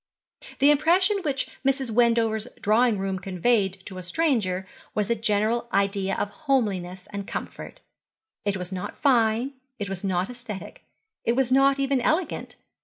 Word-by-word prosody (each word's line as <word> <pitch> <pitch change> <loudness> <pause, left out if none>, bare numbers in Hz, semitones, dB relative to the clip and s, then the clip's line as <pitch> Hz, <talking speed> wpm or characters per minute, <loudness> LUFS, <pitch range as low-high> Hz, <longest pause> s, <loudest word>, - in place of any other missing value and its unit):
The 285 +2 +6
impression 355 +8 +4
which 280 -5 -1 0.2
Mrs. 270 -2 +1
Wendover's 230 -1 +2
drawing 220 +1 +3
room 190 -1 -2
conveyed 190 0 0
to 185 -2 -7
a - - -5
stranger 190 - 0 0.3
was 210 +1 0
a - - +3
general 220 +2 +1
idea 195 0 +1
of 205 - -2
homeliness 200 - -1
and 200 -1 -5
comfort. - - -7 0.6
It 205 -1 0
was 180 0 -6
not 185 -1 -5
fine, 240 -1 +2 0.2
it 205 -1 -4
was 195 0 -5
not 185 -1 0
aesthetic, 235 -5 -8 0.4
it 235 - +2
was 260 0 +1
not 270 +1 +5
even 275 -1 +1
elegant. 320 +7 -1
220 Hz, 150 wpm, -25 LUFS, 195-265 Hz, 0.6 s, The